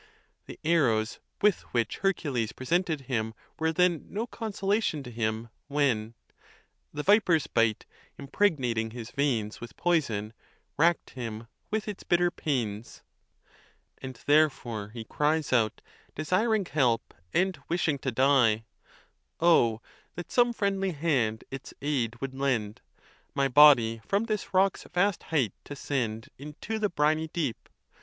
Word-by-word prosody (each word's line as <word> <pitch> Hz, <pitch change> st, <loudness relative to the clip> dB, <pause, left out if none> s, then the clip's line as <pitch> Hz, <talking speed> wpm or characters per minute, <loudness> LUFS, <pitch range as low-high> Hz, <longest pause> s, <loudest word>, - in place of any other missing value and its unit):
The -, -, -10 dB
arrows 125 Hz, -9 st, +2 dB, 0.2 s
with 210 Hz, -3 st, +4 dB, 0.2 s
which 115 Hz, -1 st, 0 dB
Hercules 140 Hz, -, -1 dB
presented 160 Hz, +2 st, 0 dB
him 110 Hz, -4 st, -2 dB, 0.2 s
were 160 Hz, 0 st, +1 dB
then 175 Hz, -1 st, +1 dB
no 215 Hz, +3 st, -3 dB
consolation 205 Hz, -, -1 dB
to 125 Hz, -, -9 dB
him, 110 Hz, 0 st, -2 dB, 0.2 s
when 130 Hz, -6 st, 0 dB
se -, -, -36 dB, 0.6 s
The 150 Hz, 0 st, -4 dB
viper's 185 Hz, -6 st, +4 dB
bite, 115 Hz, -2 st, +1 dB, 0.3 s
impregnating 135 Hz, -, 0 dB
his 120 Hz, 0 st, -8 dB
veins 125 Hz, -7 st, -1 dB
With 120 Hz, -3 st, -10 dB
poison, 115 Hz, -12 st, 0 dB, 0.4 s
rack'd 170 Hz, +3 st, +2 dB
him 115 Hz, -3 st, -6 dB, 0.2 s
with 215 Hz, 0 st, -2 dB
its 205 Hz, -2 st, -5 dB
bitter 175 Hz, 0 st, +2 dB
pains. 120 Hz, -9 st, -3 dB, 1.0 s
And 130 Hz, -1 st, -7 dB
therefore 135 Hz, -8 st, +2 dB
he 115 Hz, +1 st, -7 dB
cries 150 Hz, +5 st, 0 dB
out, 110 Hz, -4 st, +2 dB, 0.3 s
desiring 195 Hz, +7 st, +1 dB
help, 125 Hz, -8 st, 0 dB, 0.2 s
and 185 Hz, -3 st, +1 dB
wishing 165 Hz, -4 st, 0 dB
to 130 Hz, -, -2 dB
die, 120 Hz, -4 st, +3 dB, 0.7 s
Oh 120 Hz, -10 st, +4 dB, 0.3 s
that 175 Hz, -, -7 dB
some 245 Hz, -1 st, +4 dB
friendly 195 Hz, -4 st, -1 dB
hand 135 Hz, -9 st, 0 dB
its 135 Hz, 0 st, -8 dB
aid 125 Hz, -5 st, -1 dB
would 135 Hz, 0 st, -4 dB
lend, 125 Hz, -6 st, -1 dB, 0.5 s
My 140 Hz, 0 st, +2 dB
body 125 Hz, -5 st, +6 dB
from 200 Hz, -, 0 dB
this 215 Hz, -3 st, -3 dB
rock's 190 Hz, 0 st, +2 dB
vast 180 Hz, +2 st, +1 dB
height 140 Hz, -11 st, +1 dB
to 145 Hz, -, -7 dB
send 115 Hz, -6 st, -3 dB
Into 150 Hz, +10 st, -5 dB
the 210 Hz, -1 st, +1 dB
briny 155 Hz, -1 st, +1 dB
deep! 155 Hz, -7 st, -4 dB
140 Hz, 135 wpm, -28 LUFS, 115-175 Hz, 1.0 s, body